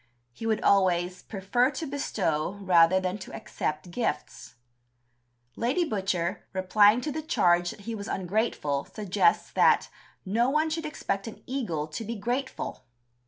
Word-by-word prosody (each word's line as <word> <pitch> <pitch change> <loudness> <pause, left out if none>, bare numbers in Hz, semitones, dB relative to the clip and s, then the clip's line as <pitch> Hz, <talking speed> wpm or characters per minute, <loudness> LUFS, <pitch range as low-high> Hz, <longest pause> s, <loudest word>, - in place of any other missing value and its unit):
He 225 - -5
would 220 -1 0
always 180 -2 +3
"prefer 220 +5 +1
to 320 +3 -5
bestow 200 - -1
rather 185 -1 +5
than 185 +2 -2
to - - -8
accept 155 +3 -4
gifts." 160 - -3 1.0
Lady 265 +10 +1
Butcher, 190 - -1
replying 205 +4 +4
to 300 - -3
the 315 - -3
charge 175 - +2
that 205 - -9
he 230 +3 -5
was 200 -2 -6
ungrateful, 180 -7 -1
suggests 215 - +1
that - - +3 0.3
"no 230 +6 +2
one 310 +3 +1
should 325 0 -2
expect 195 -9 -3
an 225 - -9
eagle 220 - -2
to 155 +8 -6
be 230 +2 -4
grateful." 245 +6 -3
200 Hz, 145 wpm, -27 LUFS, 180-245 Hz, 1.0 s, rather